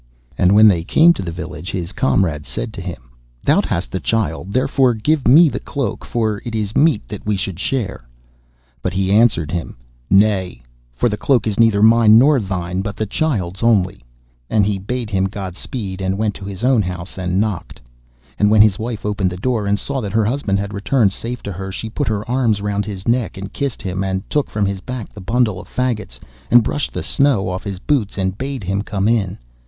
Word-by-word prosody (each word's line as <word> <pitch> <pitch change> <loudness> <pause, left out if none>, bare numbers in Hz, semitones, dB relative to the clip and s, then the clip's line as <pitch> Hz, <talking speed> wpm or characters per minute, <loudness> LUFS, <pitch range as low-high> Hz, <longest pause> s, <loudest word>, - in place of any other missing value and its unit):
And 90 +2 +3
when 110 +1 +8
they 90 -5 +3
came 165 - +5
to - - -6
the 90 -3 -4
village, 85 0 -7
his 90 -1 -4
comrade 85 - 0
said - - -5
to - - -7
him, - - -8 0.3
'Thou - - +4
hast - - -3
the - - -2
child, 100 -5 -1
therefore 130 +1 +2
give 145 +6 0
me 160 +6 +8
the - - -2
cloak, 140 -3 -4
for 110 -3 -1
it 115 -1 -5
is 105 -1 -3
meet 150 -7 +3
that 105 - -7
we 105 -1 0
should 95 -2 -4
share.' 100 - -3 0.7
But 95 - -2
he 95 0 0
answered 105 -7 +3
him: 85 -7 -4 0.3
'Nay, 95 - +2 0.3
for 90 - +2
the 105 -2 -2
cloak 130 -5 +2
is 110 -1 -2
neither 110 -3 +4
mine 110 -1 +7
nor 140 +3 +5
thine, 95 -3 -3
but 100 0 -4
the 110 - -2
child's 100 - -2
only,' 95 - +2 0.5
and 105 -2 +3
he 100 -1 -1
bade 115 +3 -4
him 95 -1 +1
Godspeed, 95 +1 -5
and 95 0 -1
went 105 -1 0
to 95 - -9
his 100 +2 -7
own 125 -3 +4
house 90 0 -6
and 90 0 0
knocked. 105 -5 -3 0.6
And 105 - +4
when 105 0 +7
his 105 -3 +2
wife 115 -1 -4
opened 105 -3 0
the 90 - -7
door 110 0 -1
and 100 0 +2
saw 135 +4 -3
that 100 -3 -5
her 110 -1 +2
husband 110 -4 0
had 100 +1 -4
returned 105 +1 +2
safe 120 +4 -5
to 100 - -4
her, 95 +1 -6
she 110 +3 -6
put 145 +3 -2
her 105 -1 -2
arms 120 -4 +1
round 100 0 -2
his 100 -1 -7
neck 115 -6 0
and 100 +1 -7
kissed 140 -4 -3
him, 95 -1 -2
and 95 0 -3
took 150 -2 0
from 105 -1 -1
his 100 -1 -2
back 125 0 -6
the 105 - -11
bundle 110 -1 +1
of - - -15
faggots, 125 -4 -3 0.3
and 120 -1 +6
brushed 145 +6 -2
the - - -4
snow 130 -10 +1
off 90 0 -4
his 100 -2 -4
boots, 110 -1 -1
and 95 0 -2
bade 135 -3 -4
him 95 +2 -1
come 100 -1 -1
in. 105 -5 +1
105 Hz, 215 wpm, -19 LUFS, 95-115 Hz, 0.7 s, when